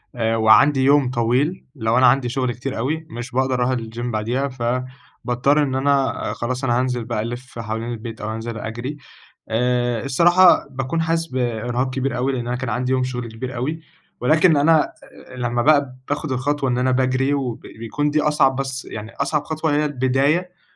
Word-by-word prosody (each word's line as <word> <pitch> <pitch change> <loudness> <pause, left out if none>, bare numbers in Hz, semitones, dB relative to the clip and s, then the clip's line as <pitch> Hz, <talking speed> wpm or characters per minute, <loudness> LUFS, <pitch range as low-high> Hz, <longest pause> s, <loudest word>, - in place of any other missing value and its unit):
آآ 115 -1 0
وعندي 130 +5 +5
يوم 140 -1 +4
طويل، 130 +9 0
لو 115 -2 0
أنا 130 - +5
عندي 125 0 +3
شغل 130 -1 -1
كتير 130 +3 -5
أوي، 155 +7 -2
مش 120 -2 -7
باقدر 130 +1 +1
أروح 125 +1 +1
الGYM 115 0 -7
بعديها. 120 +6 -1
فباضطر 125 +2 -1
إن 135 -2 -1
أنا 135 0 +2 0.2
خلاص، 125 +2 -3
أنا 120 -2 +2
هانزل 125 -2 -1
بقى 115 -3 -2
ألف 120 +2 -7
حوالين 115 +1 -4
البيت، 115 -1 -7
أو 110 +1 -3
أنزل 115 0 -5
أجري، 120 +7 -5 0.5
آآ 120 0 0
الصراحة 175 +6 +5
باكون 135 +5 -2
حاسس 165 0 0
بإرهاق 120 -1 -2
كبير 135 +1 -1
أوي، 130 +3 0
لأن 120 -2 -3
أنا 125 +1 -1
كان 130 -1 -4
عندي 125 +3 0
شغل 125 -2 -4
كبير 120 +3 -6
أوي. 155 +7 -3 0.4
ولكن 155 +5 +4
أنا 155 +2 +3 0.4
لمّا 120 -1 -1
بقى 140 -3 +3
باخد 145 -1 -2
الخطوة 135 +1 0
إن 125 - 0
أنا 130 +1 +2
باجري، 130 +2 +1
وبيكون 130 +1 -3
دي 150 +1 +2
أصعب، 150 -3 +2
بس 135 -1 -3
يعني 110 +1 -8
أصعب 145 +1 -1
خطوة 155 0 -1
هي 150 - +2
البداية. 145 +6 0
130 Hz, 175 wpm, -21 LUFS, 120-140 Hz, 0.5 s, وعندي